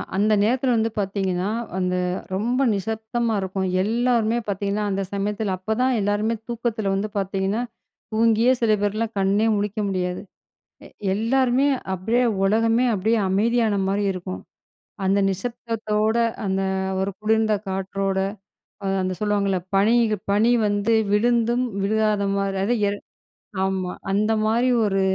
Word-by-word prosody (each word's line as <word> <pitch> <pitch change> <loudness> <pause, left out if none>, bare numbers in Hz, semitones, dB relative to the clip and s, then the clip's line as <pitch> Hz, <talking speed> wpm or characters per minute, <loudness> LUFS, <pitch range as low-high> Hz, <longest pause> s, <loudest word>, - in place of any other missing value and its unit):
அந்த 210 +2 +3
நேரத்தில 250 +3 +2
வந்து 225 +1 +1
பார்த்தீங்கன்னா, 195 -1 -1 0.3
அந்த 180 -1 0 0.4
ரொம்ப 240 +6 0
நிசப்தமா 220 +3 -2
இருக்கும். 190 0 -2 0.2
எல்லோருமே 230 +1 +1
பார்த்தீங்கன்னா, 200 +1 -1
அந்த 195 0 -1
சமயத்தில, 205 0 -1
அப்ப 220 +4 -2
தான் 260 0 +3
எல்லாருமே 205 +3 0
தூக்கத்தில 230 -4 -2
வந்து 205 +2 -2
பார்த்தீங்கன்னா, 195 +3 -1 0.5
தூங்கியே 230 +2 +4
சில 225 -2 +3
பேர்லாம் 215 +2 -1
கண்ணே 200 +3 +2
முழிக்க 205 +1 -2
முடியாது. 180 -2 -2 0.7
எ - - -13 0.3
எல்லாருமே 255 +4 +2 0.3
அப்டியே 225 +7 +1 0.2
உலகமே 225 +4 +3
அப்டியே 220 +4 +1
அமைதியான 220 +2 +2
மாரி 200 +2 0
இருக்கும். 185 0 -6 0.6
அந்த 195 +1 +2
நிசப்தத்தோட, 220 +1 -2 0.3
அந்த 195 0 0 0.4
ஒரு 195 +1 0
குளிர்ந்த 220 0 +2 0.2
காற்றோட, 195 0 -2 0.8
அந்த 185 - -1
சொல்லுவாங்கல்ல 200 -2 +1 0.2
பனி, 210 +4 +4 0.4
பனி 215 +4 +3 0.2
வந்து 205 +2 +1 0.2
விழுந்தும் 235 +3 +2 0.2
விழுகாத 215 0 +1
மாரி 195 0 -1
அது 235 - +1 0.2
ஏ - - +1 0.7
ஆமா, 190 -1 -1 0.2
அந்த 210 +2 +1
மாரி 235 +4 +2 0.2
ஒரு 195 -1 +1
210 Hz, 125 wpm, -23 LUFS, 195-230 Hz, 0.8 s, தூங்கியே